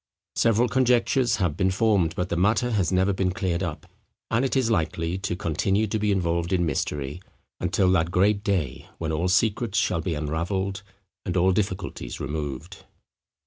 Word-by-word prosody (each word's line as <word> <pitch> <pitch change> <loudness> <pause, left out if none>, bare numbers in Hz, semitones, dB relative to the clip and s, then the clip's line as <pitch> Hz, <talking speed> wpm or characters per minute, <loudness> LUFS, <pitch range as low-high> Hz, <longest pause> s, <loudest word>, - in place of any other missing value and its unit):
Several 115 +1 +3
conjectures 125 -1 +2
have 90 -7 0
been 95 -1 +2
formed, 95 -4 +2
but 90 0 -2
the - - -1
matter 110 +7 +2
has 100 -6 +1
never 95 +2 +2
been 95 -1 0
cleared 90 -2 -1
up; 85 -5 -4 0.5
and 115 +3 +2
it 135 - 0
is 125 -4 +2
likely 85 -1 -1
to 95 -2 -2
continue 95 +5 0
to 110 +1 -2
be 105 0 +1
involved 85 -2 0
in 90 -2 +2
mystery, 75 +1 -2 0.4
until 95 -2 +2
that 85 -3 +2
great 100 +3 +2
day 95 - -2
when 80 -1 -3
all 80 +3 0
secrets 105 +2 +1
shall 85 -2 +1
be 80 0 -2
unravelled, 90 +6 -2 0.4
and 90 - -2
all 90 +2 +4
difficulties 95 - -3
removed. 70 -2 -5
95 Hz, 170 wpm, -25 LUFS, 85-105 Hz, 0.5 s, all